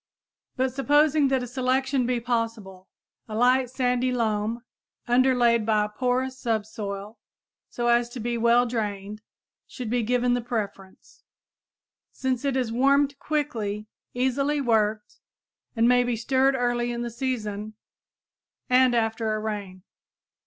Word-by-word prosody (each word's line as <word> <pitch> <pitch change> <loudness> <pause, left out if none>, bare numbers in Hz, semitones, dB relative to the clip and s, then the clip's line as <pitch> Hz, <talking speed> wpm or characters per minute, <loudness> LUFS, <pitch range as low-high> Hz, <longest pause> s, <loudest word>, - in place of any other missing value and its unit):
But 260 -1 0
supposing 290 +2 +3
that 265 -1 +1
a - - -5
selection 260 +1 0
be 250 -1 0
possible, 225 -6 -3 0.4
a 215 - -5
light 250 +2 +3
sandy 250 0 0
loam, 225 -1 -1 0.4
underlaid 245 -2 +3
by 215 -1 +2
a - - -6
porous 255 +3 -1
subsoil 210 -2 -4 0.5
so 240 0 -2
as 235 0 +3
to 240 - -8
be 235 +1 -2
well 235 +1 +4
drained, 210 -3 -4 0.5
should 245 -4 -6
be 245 0 +1
given 245 +2 +1
the 245 - 0
preference, 205 -5 -6 0.9
since 260 -1 -2
it 275 -2 0
is 245 -3 -1
warmed 275 +3 +2
quickly, 225 -9 -2 0.3
easily 275 +4 0
worked, 220 -4 0 0.6
and 230 0 +3
may 245 0 +4
be 245 -1 -1
stirred 265 +4 +2
early 240 -1 0
in 240 0 -3
the 240 - -4
season 215 -4 -4 1.0
and 250 -1 +5
after 225 -1 0
a - - -2
rain. 200 -4 -5
240 Hz, 135 wpm, -25 LUFS, 220-255 Hz, 1.0 s, and